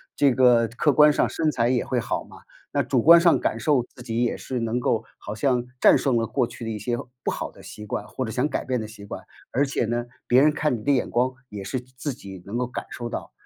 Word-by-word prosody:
这 140 -3 +4
个 120 -2 +5
客 125 +6 +1
观 150 +1 +6
上 - - +1
身 155 -1 0
材 120 -4 +1
也 125 -1 +1
会 125 -2 0
好 - - -2
嘛， - - -14 0.4
那 - - +2
主 125 - +1
观 170 +5 +8
上 170 -1 +5
感 - - -1
受， 140 -6 +2
自 125 - -12
己 120 0 -1
也 120 - 0
是 130 -2 -4
能 115 +1 -1
够 115 -2 0
好 105 - -7
像 125 +1 +1
战 - - +6
胜 130 -4 +1
了 115 - 0
过 130 +1 +1
去 115 - -9
的 - - -3
一 110 - -3
些 120 +3 -2 0.3
不 - - 0
好 - - -4
的 - - -16
习 105 - -9
惯， 105 0 -4
或 130 - -4
者 110 - -5
想 130 +6 0
改 - - -3
变 125 -3 -1
的 110 - -5
习 105 -2 -11
惯。 - - -7 0.3
而 140 +4 +2
且 135 -4 -1
呢， 120 +1 -2 0.2
别 125 +2 +5
人 150 - +5
看 150 -4 0
你 105 - -10
的 145 - +2
眼 130 - +1
光 125 +2 +1 0.2
也 100 -1 -7
是 125 +6 -3
自 130 +3 -6
己 95 -6 -11
能 105 +4 -4
够 125 0 -1
感 125 - -6
受 120 -1 -5
到， - - -6
125 Hz, 290 characters per minute, -24 LUFS, 115-135 Hz, 0.4 s, 观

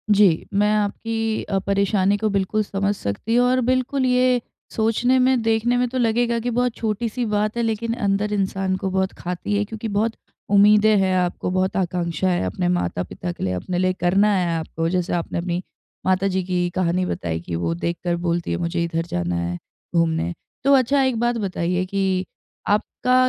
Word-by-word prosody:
जी, 195 -6 +4
मैं 205 +1 +3
आपकी 220 +1 -1
अ, 195 - -1
परेशानी 200 0 +1
को 215 +1 0
बिल्कुल 200 +1 0
समझ 200 0 -1
सकती 195 - -2
हूँ 245 +1 +5
और 255 +1 +2
बिल्कुल 255 +1 +1
ये 250 -1 +3 0.3
सोचने 230 +3 +2
में 255 -1 +3
देखने 225 +2 +1
में 250 0 +2
तो 260 - -4
लगेगा 235 0 +1
कि 240 +2 -2
बहुत 245 0 0
छोटी-सी 225 +2 -2
बात 210 +1 0
है 235 - +1
लेकिन 225 +1 -1
अंदर 205 -2 0
इंसान 190 -1 0
को 190 - -2
बहुत 190 0 0
खाती 180 +3 -3
है 205 - +1
क्योंकि 220 +1 -6
बहुत 220 +2 0 0.4
उम्मीदें 210 +1 +6
हैं 190 -1 +2
आपको 180 0 -1
बहुत 185 +1 0
आकांक्षा 175 -1 -1
है 175 - 0
अपने 90 -1 -1
माता-पिता 90 - -2
के - - -7
लिए, 95 - 0
अपने 175 - -3
लिए 185 +1 +2
करना 190 +4 +2
है 180 -2 +1
आपको। 165 0 -3
जैसे 180 0 -1
आपने 175 +1 -2 0.4
माता 185 +1 +2
जी 190 -1 0
की 180 -1 0
कहानी 180 0 +1
बताई 85 - -3
कि 85 0 -5
वो 85 0 -1
देखकर 170 - -2
बोलती 170 0 -1
हैं - - 0
मुझे 170 0 -1
इधर 165 0 -2
जाना 90 - -2
है 85 +1 -2 0.4
घूमने। 165 +1 +1 0.3
तो 280 +1 +5
अच्छा 275 +1 +4
एक 260 -4 0
बात 240 0 +1
बताइए 185 -3 -1
कि 190 -1 0 0.4
आपका 215 +4 0
195 Hz, 185 wpm, -22 LUFS, 175-225 Hz, 0.4 s, उम्मीदें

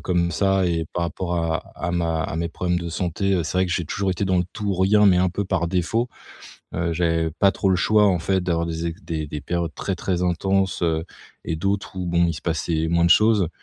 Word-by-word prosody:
comme 85 -1 0
ça 95 +2 +2
et 85 -2 -1
par 90 - 0
rapport 85 +2 -3
à 85 -1 0 0.2
à 85 - -3
ma 85 -2 0
à 80 - -4
mes 85 0 -1
problèmes 90 +1 -1
de 85 - -5
santé, 90 +3 -1
heu, 85 - +1
c'est 85 +4 -2
vrai 95 - +3
que 90 - -2
j'ai 85 - -1
toujours 95 +3 -1
été 95 +2 -1
dans 95 -1 +2
le 90 - +1
tout 105 -2 -4
ou 95 - +1
rien, 105 +2 +5
mais 90 -3 +5
un 90 0 +3
peu 100 +3 -3
par 90 -3 -1
défaut, 95 +7 0 0.7
heu. 85 -1 -1
J'avais 80 -1 +1
pas 100 - +5
trop 95 - 0
le 95 - +4
choix 105 +2 +4
en 90 -2 +3
fait 95 +3 0
d'avoir 85 -2 0
des 85 0 -3
é 85 - -3
des 80 -2 -3
des 75 -1 -5
périodes 85 +1 -2
très, 95 - -2
très 90 0 -1
intenses, 95 +2 0
heu, 80 -1 +1 0.4
et 80 - -1
d'autres 100 +3 -2
où 90 -1 -3
bon, 85 0 +3
il 85 - 0
se - - -8
passait 80 -1 -1
moins 85 +1 +2
de - - +3
choses. 105 -6 +4
85 Hz, 255 wpm, -23 LUFS, 85-95 Hz, 0.7 s, rien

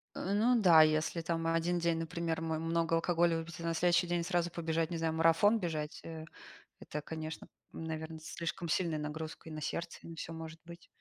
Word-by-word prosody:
Э, 190 - -2
ну 235 +3 +4
да, 170 -6 +8
если 155 +2 +2
там 165 0 -1
1 165 +2 +1
день, 170 -1 +1
например, 165 0 -2
мой 160 -1 -1
много 165 0 +1
алкоголя 170 0 +2
выпить, 165 0 -7
а - - -6
на 165 0 0
следующий 175 +1 +3
день 175 0 0
сразу 175 -1 0
побежать, 165 -1 -1
не 170 - -2
знаю, 160 -1 0
марафон 165 +7 +5
бежать, 155 -5 -3
э, 160 -1 -7 0.6
это, 150 - -5
конечно, 160 +1 -6 0.2
наверно, 160 0 -5
слишком 170 +1 -4
сильная 165 -1 +1
нагрузка 155 +2 -5
и - - -7
на 155 - -5
сердце, 170 +3 -3
и - - -10
на 165 - -8
всё 165 - -5
может 160 0 -8
быть. 170 0 -11
165 Hz, 200 wpm, -33 LUFS, 160-170 Hz, 0.6 s, да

